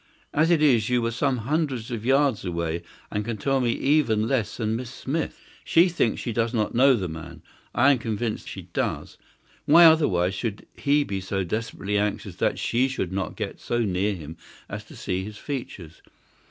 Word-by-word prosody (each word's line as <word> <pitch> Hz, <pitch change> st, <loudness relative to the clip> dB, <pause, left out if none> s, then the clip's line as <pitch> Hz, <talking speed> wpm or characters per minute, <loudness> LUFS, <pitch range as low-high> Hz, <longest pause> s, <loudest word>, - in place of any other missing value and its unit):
As 155 Hz, +3 st, +3 dB
it 165 Hz, -3 st, +4 dB
is 120 Hz, -6 st, +4 dB
you 125 Hz, 0 st, +3 dB
were 115 Hz, 0 st, -1 dB
some 130 Hz, +2 st, 0 dB
hundreds 135 Hz, -5 st, -1 dB
of 115 Hz, -3 st, -4 dB
yards 135 Hz, -2 st, +2 dB
away, 85 Hz, -2 st, -2 dB, 0.3 s
and 105 Hz, -, -1 dB
can 115 Hz, 0 st, -4 dB
tell 135 Hz, +5 st, +1 dB
me 120 Hz, -2 st, +2 dB
even 130 Hz, -7 st, +2 dB
less 115 Hz, -6 st, -1 dB
than 110 Hz, -1 st, -1 dB
Miss 125 Hz, +1 st, -5 dB
Smith. 145 Hz, +5 st, -3 dB, 0.2 s
She 170 Hz, +3 st, +4 dB
thinks 145 Hz, -10 st, 0 dB
she 120 Hz, -, -3 dB
does 115 Hz, +2 st, 0 dB
not 110 Hz, -2 st, 0 dB
know 130 Hz, +2 st, +5 dB
the 95 Hz, -6 st, -2 dB
man; 80 Hz, -1 st, -9 dB, 0.3 s
I 140 Hz, +4 st, +6 dB
am 135 Hz, -, +2 dB
convinced 110 Hz, 0 st, -3 dB
she -, -, -7 dB
does. -, -, -3 dB, 0.5 s
Why, 165 Hz, +4 st, +8 dB
otherwise, 95 Hz, -, +4 dB
should 105 Hz, +1 st, -4 dB
he 145 Hz, +1 st, +2 dB
be 100 Hz, -6 st, -4 dB
so 95 Hz, +1 st, -2 dB
desperately 105 Hz, +1 st, -2 dB
anxious 105 Hz, 0 st, -2 dB
that -, -, +1 dB
she 125 Hz, +3 st, +1 dB
should 130 Hz, -9 st, -3 dB
not 95 Hz, -2 st, -3 dB
get -, -, -5 dB
so 120 Hz, 0 st, -1 dB
near 100 Hz, 0 st, 0 dB
him 80 Hz, -1 st, -9 dB, 0.3 s
as -, -, -6 dB
to -, -, -14 dB
see 95 Hz, +1 st, -3 dB
his 105 Hz, +1 st, -8 dB
features? 105 Hz, -, -7 dB
115 Hz, 195 wpm, -25 LUFS, 100-135 Hz, 0.5 s, Why